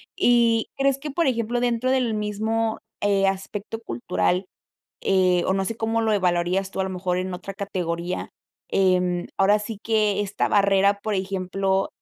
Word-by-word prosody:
Y 235 -2 +3
crees 275 0 +2
que, 295 +2 -6
por 330 +2 +1
ejemplo, 240 -1 0
dentro 245 +1 +1
del 255 -4 +1
mismo, 220 +2 -1 0.2
eh, 200 -1 +3
aspecto 195 +3 -3
cultural, 120 - -1 0.6
eh, 185 -2 +3
o, 190 - +2
no 195 - 0
sé 230 - -3
cómo 225 0 0
lo 220 -1 +2
evaluarías 185 0 +1
tú, 195 - -4
a - - +1
lo 190 - -4
mejor 180 -1 -2
en 185 0 -3
otra 185 +2 -7
categoría, 180 -3 -3 0.4
eh, 180 -2 +2
ahora 205 +2 +4
sí 210 0 -6
que 215 -3 +1
esta 205 0 -1
barrera, 200 0 +3
por 215 - -1
ejemplo, 190 0 -1
200 Hz, 165 wpm, -24 LUFS, 185-225 Hz, 0.6 s, ahora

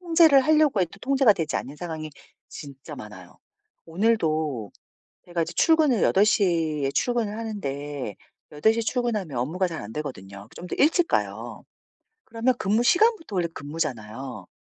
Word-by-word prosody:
통제를 325 -5 +5
하려고 305 -6 +3
해도 180 +2 -2
통제가 265 -3 +4
되지 165 -5 -2
않는 140 - -5
상황이 160 -2 -6 0.4
진짜 140 -2 -10
많아요. - - -12 0.5
오늘도 160 - 0 0.5
제가 175 -1 -3
이제 - - -4
출근을 310 -8 +3
8:00 170 -7 +2
에 135 - +1
출근을 230 -4 -1
하는데 145 - -5 0.4
8:00 220 +10 +2
에 - - -2
출근하면 220 - -2
업무가 165 +10 0
잘 165 -3 -5
안되거든요. 105 -5 -7
그 - - -19
좀 180 - -8
더 - - -5
일찍 330 +4 +3
가요. - - -2 0.6
그러면 235 +3 0
근무 210 +5 +1
시간부터 350 - +2
원래 175 -2 +1
근무잖아요. 135 -5 -5
180 Hz, 315 characters per minute, -25 LUFS, 145-235 Hz, 0.6 s, 통제를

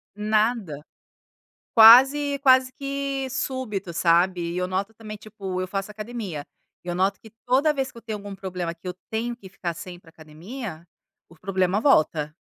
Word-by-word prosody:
Nada. 210 -7 0 0.9
Quase 270 +6 +7
quase 260 -1 +5
que 275 -1 -3
súbito, 255 -8 -3
sabe, 175 +2 +2
e - - -4
eu 180 0 -1
noto 195 +4 -3
também, 215 -1 -9
tipo, 200 -3 -6
eu 185 - -3
faço 195 +1 -4
academia, 210 -8 -6 0.4
e 175 - -7
eu 175 - -2
noto 190 +2 +1
que 220 - -14 0.2
toda 270 +5 +3
vez 270 -1 -2
que - - -17
eu - - -10
tenho 220 -2 -5
algum 200 -1 -8
problema 180 -3 -4
que 165 - -27
eu 180 - -3 0.2
tenho 230 +2 -2
que 200 - -13
ficar 180 -2 -5
sem 175 +2 -9
ir 175 - -15
pra 165 - -19
academia, 165 - -9 0.4
o 170 - -17
problema 185 +2 0
volta. 155 - +2
205 Hz, 180 wpm, -24 LUFS, 180-240 Hz, 0.9 s, Quase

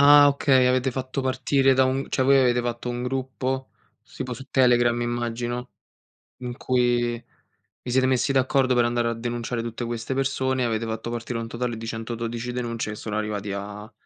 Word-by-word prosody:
Ah 145 0 +8
okay, 135 -2 +3
avete 130 +1 +2
fatto 130 +1 -3
partire 130 +1 +2
da 130 0 +4
un 130 +1 0
cioè 130 - +1
voi 135 0 +6
avete 125 -1 +3
fatto 120 0 -3
un 120 0 -3
gruppo, 130 0 -3 0.4
tipo 125 - -4
su 130 +3 -8
Telegram 120 -2 +4
immagino, 120 +1 -3 0.7
in 125 -1 -6
cui 120 -1 +1 0.7
vi 125 - -5
siete 130 +1 +3
messi 130 +1 +2
d'accordo 130 -1 +2
per 120 -1 +4
andare 120 0 +1
a - - -1
denunciare 120 0 -3
tutte 115 +1 -4
queste 120 +2 -3
persone, 130 -1 0
avete 115 0 -1
fatto 110 +1 -4
partire 120 0 -4
un 115 - -4
totale 120 0 -3
di 115 - -7
112 115 +1 -4
denunce 115 -3 -3
che 105 - -6
sono 105 0 -4
arrivati 105 -2 -3
a 105 +2 -6
120 Hz, 180 wpm, -25 LUFS, 115-130 Hz, 0.7 s, Ah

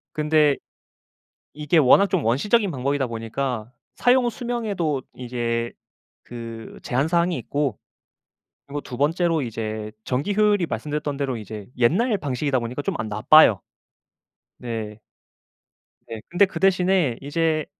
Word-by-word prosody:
근데 150 -2 +3 1.0
이게 150 +2 0
워낙 160 +7 +6
좀 185 -6 0
원시적인 195 - +2
방법이다 140 0 -1
보니까 115 +1 -4 0.2
사용 245 0 +3
수명에도 215 - -2
이게 120 -1 -3 0.5
그 115 -2 -8
제한 130 +4 0
사항이 170 0 +1
있고. 145 -2 -2 0.9
그리고 145 +1 -4
2 125 - -8
번째로 165 +2 +1
이제 110 -3 -4
전기 140 +11 -1
효율이 210 -3 +3
말씀드렸던 150 -2 -3
대로 135 -3 -2
이제 105 -1 -8
옛날 205 - +2
방식이다 140 -3 -1
보니까 120 +4 -4
좀 - - -2
안 110 - -2
나빠요. 110 +1 +6 1.0
네. 110 -3 -5 1.1
네. 110 -1 -7
근데 175 +4 +4
그 190 - -7
대신에 180 -8 +2
이제 155 +1 0
145 Hz, 270 characters per minute, -23 LUFS, 120-175 Hz, 1.1 s, 워낙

